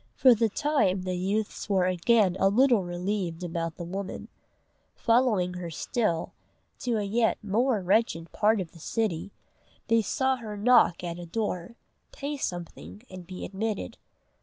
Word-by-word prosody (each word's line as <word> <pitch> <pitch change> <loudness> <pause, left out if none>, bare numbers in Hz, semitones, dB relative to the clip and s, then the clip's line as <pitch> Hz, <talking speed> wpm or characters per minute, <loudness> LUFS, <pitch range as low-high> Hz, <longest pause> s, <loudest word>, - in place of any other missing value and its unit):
For 255 -2 +7
the 225 0 +2
time 210 -9 +1
the 185 0 -2
youths 200 +4 -2
were 190 -2 +3
again 185 +2 +3
a 195 - +4
little 240 -1 +4
relieved 180 -1 -3
about 165 -1 -3
the - - -5
woman: 190 +3 -6 0.7
following 230 -7 +2
her 180 -1 -5
still, 165 - -1 0.5
to 240 -2 -1
a 210 - -1
yet 225 +3 +1
more 215 +1 +1
wretched 175 -4 +1
part 215 +1 +2
of 180 -4 -5
the 170 - -15
city, 200 0 -2 0.6
they 230 0 +4
saw 265 +5 0
her 215 -4 -7
knock 230 -5 +4
at 170 0 -4
a 175 - -8
door, 210 +1 -3 0.4
pay 290 +1 -4
something, 180 - -6
and 185 -2 -9
be 185 0 -6
admitted. 205 - -4
200 Hz, 155 wpm, -27 LUFS, 175-230 Hz, 0.7 s, For